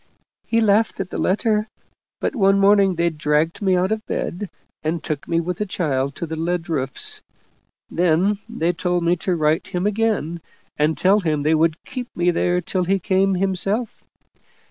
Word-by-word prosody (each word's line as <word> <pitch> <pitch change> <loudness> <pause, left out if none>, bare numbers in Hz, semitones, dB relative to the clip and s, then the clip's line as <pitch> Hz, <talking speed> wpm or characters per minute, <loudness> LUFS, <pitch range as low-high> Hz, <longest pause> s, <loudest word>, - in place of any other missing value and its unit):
He 230 0 +2
laughed 220 +1 +2
at 190 -2 -4
the - - -4
letter, 215 +2 +1 0.5
but - - -2
one 195 -4 +4
morning 195 -1 +4
they 170 0 +1
dragged 150 +2 0
me 190 -2 +2
out 185 +3 +1
of 220 0 0
my - - -1
bed, 185 +2 -4 0.3
and 160 +2 -2
took 150 -3 -4
me 165 -1 +1
with 175 +1 -3
the 210 - 0
child 140 -7 -1
to - - -4
the 160 0 -5
lead 170 +1 -2
roofs 135 -4 0 0.7
then 180 +4 +1
they 175 -7 0
told 175 0 -1
me 170 +1 +3
to 180 +1 -1
write 155 0 +1
him 180 +1 -2
again 205 -6 0 0.3
and 150 +2 +1
tell 195 +3 +4
him 155 -6 -1
they 155 +2 +3
would 160 +1 +1
keep 255 -1 -6
me 175 0 +3
there 180 +1 +1
till 180 +1 -1
he 195 +2 +2
came 190 +1 +1
himself. 195 +5 0
180 Hz, 185 wpm, -21 LUFS, 165-195 Hz, 0.7 s, one